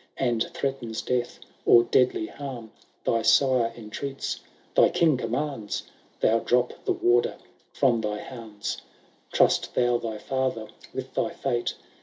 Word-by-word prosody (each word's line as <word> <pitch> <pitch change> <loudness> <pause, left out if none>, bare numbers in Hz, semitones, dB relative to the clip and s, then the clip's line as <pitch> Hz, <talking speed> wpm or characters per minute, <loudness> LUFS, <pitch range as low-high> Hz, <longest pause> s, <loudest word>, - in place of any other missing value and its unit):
And 120 -4 +1
threatens 125 -5 -2
death 125 -1 -1 0.3
or 120 - +7
deadly 125 -4 +2
harm. 125 -4 -7 0.3
Thy 115 - +2
sire 125 -1 +4
entreats, 135 +5 -4 0.3
thy - - +6
king 160 -4 +3
commands. 125 -2 -2 0.4
Thou 115 +1 +4
drop 125 +1 +2
the - - +2
warder 120 0 +2 0.4
from 120 -4 +2
thy 105 -1 -2
bands. 110 -4 -6 0.5
Trust - - +3
thou 120 -1 +3
thy 110 -2 -4
father 130 -1 -1 0.3
with - - -6
thy - - 0
fate. 120 0 -2
120 Hz, 130 wpm, -26 LUFS, 115-130 Hz, 0.5 s, or